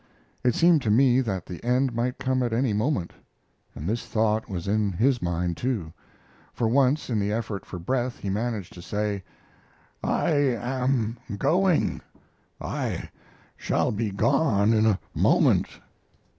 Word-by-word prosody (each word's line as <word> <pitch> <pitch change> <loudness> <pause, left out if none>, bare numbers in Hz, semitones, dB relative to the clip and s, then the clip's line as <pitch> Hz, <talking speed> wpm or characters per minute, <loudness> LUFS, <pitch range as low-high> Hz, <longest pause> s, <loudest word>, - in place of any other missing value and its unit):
It 125 -2 +2
seemed 170 -3 +5
to 115 - -1
me 125 +3 +4
that 95 -7 -3
the 90 - -8
end 125 +1 +1
might 120 +2 -1
come 130 0 0
at 120 -2 -1
any 120 -1 +1
moment, 105 - -1 0.6
and 75 - -6
this 115 +3 -1
thought 110 +1 0
was 90 -2 -4
in 105 -1 +1
his 120 +7 +2
mind, 85 0 -1
too, 110 -11 -2 0.6
for 115 - 0
once 135 +4 +2
in 110 - +1
the 100 0 0
effort 110 -2 -3
for 90 - -7
breath 125 +7 -2
he - - -7
managed 105 -1 -2
to 90 - -10
say: 105 +1 -2 0.8
"I - - +1
am 125 -3 0 0.2
going 180 - +2 0.6
I - - -4 0.4
shall - - 0
be 110 +1 -1
gone 110 -1 +2
in 110 0 +3
a 100 -3 +2
moment." - - +3
115 Hz, 150 wpm, -26 LUFS, 100-130 Hz, 0.8 s, seemed